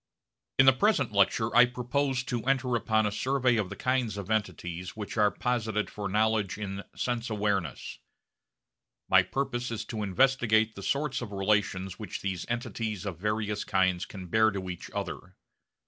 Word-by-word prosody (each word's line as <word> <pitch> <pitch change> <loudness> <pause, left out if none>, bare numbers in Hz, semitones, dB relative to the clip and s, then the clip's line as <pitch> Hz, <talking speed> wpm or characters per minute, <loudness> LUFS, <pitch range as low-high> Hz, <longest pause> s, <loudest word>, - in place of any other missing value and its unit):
In 135 - +7
the 135 - +8
present 210 - +2
lecture 105 +3 +2
I 125 - +8
propose 125 +2 -1
to 120 -4 -3
enter 130 -2 +1
upon 110 -1 +2
a 105 - 0
survey 130 +2 +1
of 105 -4 -1
the - - -6
kinds 125 -5 0
of 100 +1 -5
entities 90 -4 -2
which 105 -2 -6
are 105 -2 +4
posited 110 -3 -1
for 100 -1 -4
knowledge 110 -1 +1
in 100 -2 -4
sense 120 -1 -2
awareness. 100 - -2 1.1
My - - +6
purpose 130 -3 -2
is 115 -2 -4
to 110 - -5
investigate 110 0 +3
the 100 - -9
sorts 140 +3 -1
of 115 -4 -6
relations 95 -2 0
which 105 -4 -6
these 95 -3 -3
entities 115 -4 -3
of 90 -5 -5
various 105 +1 -1
kinds 95 -2 +1
can 95 -3 -8
bear 110 +5 +4
to 95 -3 -4
each 90 - -8
other. - - -6
110 Hz, 165 wpm, -29 LUFS, 100-125 Hz, 1.1 s, the